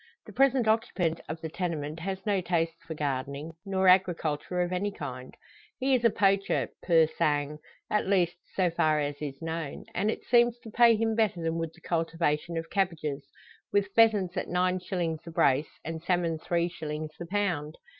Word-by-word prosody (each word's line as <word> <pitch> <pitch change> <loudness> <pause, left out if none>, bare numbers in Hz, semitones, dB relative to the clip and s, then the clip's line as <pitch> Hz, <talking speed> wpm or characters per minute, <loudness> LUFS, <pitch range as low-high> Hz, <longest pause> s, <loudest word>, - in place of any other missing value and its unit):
The - - -12
present 265 -3 +3
occupant 205 -7 +1
of 160 0 -5
the 160 - -4
tenement 160 -3 -3
has 190 +3 -4
no 200 -3 +1
taste 165 -2 -1
for 160 - -5
gardening, 140 +1 -3 0.2
nor 190 -1 +1
agriculture 180 -2 +2
of 175 +1 -3
any 200 +3 -1
kind; 130 -8 -7 0.4
he 265 +1 +1
is 250 -2 +2
a 230 - +6
poacher, 195 -1 +2
pur 165 -2 +5
sang 150 -1 -1 0.3
at 210 - 0
least, 180 -3 +2 0.2
so 180 -3 +2
far 155 -2 +2
as 145 0 -3
is 140 -2 -5
known. 160 -3 -4
And 210 - 0
it - - -3
seems 240 0 +4
to 220 - -10
pay 235 0 +6
him 225 +1 +1
better 210 -6 +1
than 165 0 -1
would 165 -1 -4
the - - -19
cultivation 165 -1 -1
of 165 0 -5
cabbages 155 -7 -1 0.4
with 200 0 +1
pheasants 210 -6 +4
at - - -2
nine 180 +1 +1
shillings 175 -3 -2
the - - -9
brace, 145 -2 +1
and 165 0 -4
salmon 170 -2 0
three 170 +1 0
shillings 155 -2 -5
the 170 - -6
pound. 175 -6 -1
170 Hz, 185 wpm, -28 LUFS, 155-195 Hz, 0.4 s, a